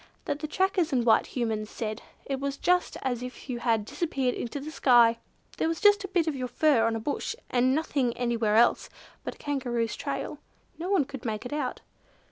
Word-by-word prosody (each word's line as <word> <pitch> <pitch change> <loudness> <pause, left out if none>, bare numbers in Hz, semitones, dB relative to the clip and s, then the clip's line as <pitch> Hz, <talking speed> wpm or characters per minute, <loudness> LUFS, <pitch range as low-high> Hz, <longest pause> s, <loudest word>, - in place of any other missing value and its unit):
—that 290 - -2
the 305 - -3
trackers 375 0 +1
and 245 -3 +1
white 225 - +4
Humans 220 -4 -2
said 215 -1 -4 0.2
it 270 -1 -2
was 280 0 -3
just 360 +3 +1
as 250 -2 -1
if 250 +2 -8
you 240 - -3
had 230 -3 +1
disappeared 270 -2 -1
into 240 +4 -4
the 300 +3 -7
sky! 235 -5 +5 0.4
There - - +2
was 330 0 -1
just 410 -1 +5
a - - -3
bit 360 -4 +1
of 315 -3 -1
your 255 -1 -3
fur 250 -3 +3
on 225 - 0
a - - -2
bush, 290 - -3 0.2
and 255 +1 +3
nothing 275 -6 0
anywhere 235 -3 +1
else 235 +2 +4 0.3
but - - -5
a - - -22
Kangaroo's 245 -5 -2
trail. - - -4 0.4
No 350 +3 -3
one 380 -8 +3
could 270 -2 -8
make 215 -1 -3
it 245 - -5
out." 300 - -2
255 Hz, 210 wpm, -28 LUFS, 235-305 Hz, 0.4 s, sky